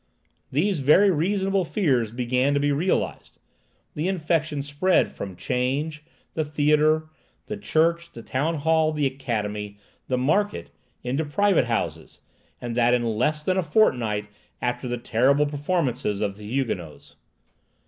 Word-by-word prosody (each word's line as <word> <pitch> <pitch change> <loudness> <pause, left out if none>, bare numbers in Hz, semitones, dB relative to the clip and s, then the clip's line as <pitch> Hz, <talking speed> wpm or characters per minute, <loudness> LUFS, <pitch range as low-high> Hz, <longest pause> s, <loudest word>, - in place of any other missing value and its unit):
These 175 +5 +1
very 165 +9 +5
reasonable 190 +3 +1
fears 135 - 0
began 125 +3 +1
to - - +2
be 145 0 +1
realized. 165 +7 -1 0.6
The 155 +4 -2
infection 155 -5 0
spread 145 +6 +1
from 95 -2 -7
'change, 135 - -2 0.3
the 160 - 0
theatre, 150 +1 +2 0.4
the 215 - -4
church, 170 -3 +1
the 115 - -10
town 150 +6 -1
hall, 160 +1 +2
the 150 -2 0
academy, 105 -6 -3 0.3
the 130 - 0
market, 180 +11 0 0.3
into 135 +5 -1
private 180 0 +2
houses, 115 -1 -3 0.4
and 120 -1 -5
that 120 0 +4
in 120 - 0
less 125 +8 0
than 185 +2 0
a - - +3
fortnight 125 - +1 0.3
after 125 +1 -2
the 120 0 -2
terrible 130 +6 +2
performance 145 -3 -1
of 100 -1 -1
the 105 0 -10
"Huguenots." 85 - -4
145 Hz, 140 wpm, -24 LUFS, 120-160 Hz, 0.6 s, very